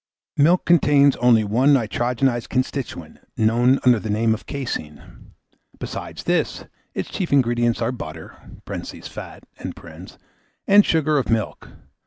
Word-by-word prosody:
Milk 170 +5 +3
contains 145 -4 +4
only 120 -3 +4
one 125 +8 +3
nitrogenised 120 +1 -1
constituent, 130 - -4 0.2
known 120 +4 +3
under 125 -3 +5
the 110 - -6
name 110 +2 +2
of 110 - -7
caseine; 115 - -7 0.4
besides - - -7
this, - - -1 0.3
its - - -4
chief 185 - -3
ingredients 120 -3 +2
are 115 - 0
butter 80 -10 -8 0.3
(fat), - - -8 1.2
and 205 +1 +6
sugar 155 -2 +2
of 135 - -4
milk. 110 -3 -2
120 Hz, 120 wpm, -21 LUFS, 110-140 Hz, 1.2 s, and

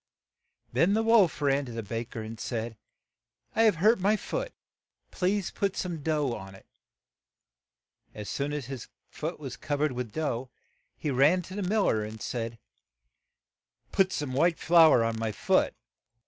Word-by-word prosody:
Then 165 - +3
the 225 - +2
wolf 225 -9 +4
ran 140 0 +2
to 120 -2 -8
a 115 - -3
ba 115 +3 -3
ker, 115 -1 -7
and 110 0 -8
said, 115 -1 -3 0.8
"I 225 - +3
have 220 -4 +5
hurt 215 +7 +4
my 200 +3 +3
foot; - - -4 0.6
please 195 +1 0
put 200 -1 -1
some 170 -4 -3
dough 150 -4 0
on 95 -3 -8
it. - - -16 0.5
' - - -63 0.2
' - - -42
As 105 -1 -6
soon 140 +1 -2
as 145 -3 -3
his 130 -2 -7 0.2
foot 160 +3 -5
was 135 -4 -6
cov 145 -2 -3
ered 150 -2 +2
with 125 -3 -4
dough, 130 -4 -2 0.5
he 150 - -2
ran 145 +8 +4
to 185 - -10
the 205 - -2
mil 205 +3 +1
ler 110 - +2
and 110 +1 -7
said, 115 0 -4 1.3
"Put 190 -1 +3
some 145 -3 -3
white 165 +5 +3
flour 160 -7 +6
on 115 0 -1
my 110 -1 -1
foot." 100 - +1
145 Hz, 175 wpm, -28 LUFS, 115-180 Hz, 1.3 s, flour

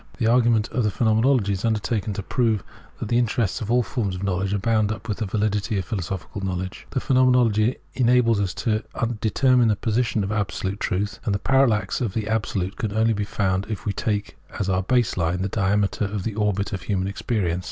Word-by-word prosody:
The 115 - 0
argument 115 -2 +3
of 125 - -1
the 105 - +2
Phenomenology 110 0 +2
is 95 - -4
undertaken 110 -2 0
to 100 - -4
prove 110 -2 0 0.4
that - - -4
the 120 - +3
interes 115 -4 0
fcs - - -5
of 110 - -4
all 125 +1 +3
forms 100 -2 -2
of 90 - -6
knowledge 95 0 -1
are 100 - +1
bound 110 0 +1
up 110 +1 -6
with 105 -1 -3
the 110 - -2
validity 105 +1 0
of 95 - -2
philosophical 95 0 -4
knowledge. 95 -1 -4
The 135 - -1
Phenotnenology 125 -4 +3 0.2
enables 120 -3 +3
us 95 -3 -2
to 110 -2 +2 0.4
determine 125 +2 +3
the 105 - +3
position 115 0 0
of 95 - -3
Absolute 100 -1 -2
Truth, 105 +2 -2
and 100 - 0
the - - +2
parallax 125 -2 +2
of 110 -6 -2
the 110 -2 -2
Absolute 105 -3 -1
can 110 -4 -2
only 110 +1 +3
be 105 -1 -2
found 95 -1 -1
if 105 -4 -5
we 100 - 0
take 105 -1 -2
f.s 100 - -3
our 95 0 +2
base 120 +2 +1
line 90 +2 0
the 100 - -1
diameter 100 +1 +1
of 100 -1 -3
the 115 - -2
orbit 105 -2 -1
of 95 - -3
human 95 0 -1
ex 100 - -6
perience. 90 -7 0
105 Hz, 215 wpm, -23 LUFS, 100-115 Hz, 0.4 s, argument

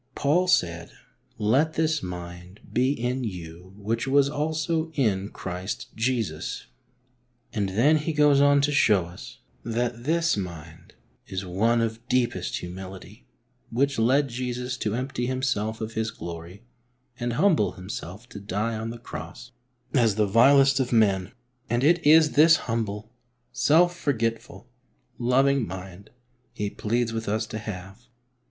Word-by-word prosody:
Paul 170 +6 +2
said: 85 - +1 0.3
" - - -43
Let 135 +10 +2
this 155 -1 +1
mind 90 +1 -8
be 130 +2 +2
in 125 -1 -2
you 90 -2 -8
which 115 +4 -2
was 140 +1 +4
also 160 +2 -1
in 105 -7 0
Christ 95 0 -6
Jesus," 115 -9 -2 0.9
and 100 -4 -1
then 125 +11 +4
he 155 +2 -2
goes 150 -2 +4
on 145 0 +5
to 145 +1 +1
show 105 -10 +3
us 85 +1 -12 0.2
that 120 +1 -2
this 170 +2 +2
mind 85 -5 -8 0.3
is 95 0 -4
one 115 +6 +1
of 115 +1 -3
deepest 125 -2 0
humility, 95 -7 -9 0.4
which 140 +2 0
led 135 +5 +3
Jesus 125 +1 -3
to 105 -3 -2
empty 125 -1 -3
Himself 115 -4 -1
of 110 0 -4
His 110 0 -1
glory 85 0 -9 0.6
and 120 -1 -2
humble 160 - +2
Himself 95 +2 -8
to - - -9
die 105 +3 -2
on 110 +1 -4
the 120 - -6
Cross 90 +2 -9 0.4
as 115 -6 +3
the 105 0 +2
vilest 135 +6 +5
of 130 -2 -1
men, 100 -5 +2 0.4
and 120 +2 0
it 170 +3 +4
is 155 0 +6
this 160 +2 +6
humble, 110 -2 -3 0.4
self 165 +6 +3
forgetful, 120 -4 -2 0.5
loving 130 0 +2
mind 95 +2 -9 0.4
he 105 -1 -3
pleads 115 +1 -1
with 115 -2 -3
us 110 +2 0
to 110 0 -6
have. 100 +2 -8
115 Hz, 145 wpm, -25 LUFS, 100-135 Hz, 0.9 s, is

